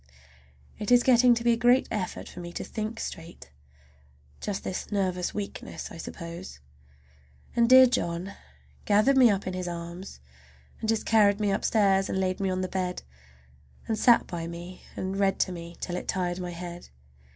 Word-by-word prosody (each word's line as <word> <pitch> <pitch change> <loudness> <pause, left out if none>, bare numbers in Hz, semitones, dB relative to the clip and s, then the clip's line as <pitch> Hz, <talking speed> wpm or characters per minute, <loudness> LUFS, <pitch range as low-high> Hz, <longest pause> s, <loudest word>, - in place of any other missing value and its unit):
It 210 - -3
is 245 0 +6
getting 245 -1 +6
to 235 - -3
be 240 - +4
a - - 0
great 245 +2 +4
effort 210 -5 -3
for - - -10
me 175 0 -7
to - - -4
think 220 +1 -5
straight. 165 - -8 0.9
Just 200 -2 -4
this 185 - -5
nervous 185 -3 -1
weakness, 205 -1 -6
I - - -9
suppose. 170 - -8 1.0
And 235 0 +3
dear 260 0 +10
John 180 -5 -2 0.5
gathered 215 +7 +4
me 255 -3 +7
up 200 -2 0
in 185 - -3
his 185 -1 -4
arms, 170 - -7 0.6
and 220 - -3
just 225 -1 +1
carried 205 -2 +4
me 205 -1 +1
upstairs 195 -1 +2
and 190 - -1
laid 185 -1 -1
me 195 -1 0
on 185 0 -1
the 185 - -1
bed, 180 -1 -3 0.8
and 225 - 0
sat 235 +2 +5
by 170 -2 -5
me 175 +2 -8
and 190 +1 -3
read 195 -1 +2
to 185 - +1
me 170 -1 -8
till 175 - -4
it - - -5
tired 180 -1 -1
my 180 -1 -4
head. 175 0 -8
190 Hz, 180 wpm, -27 LUFS, 175-220 Hz, 1.0 s, dear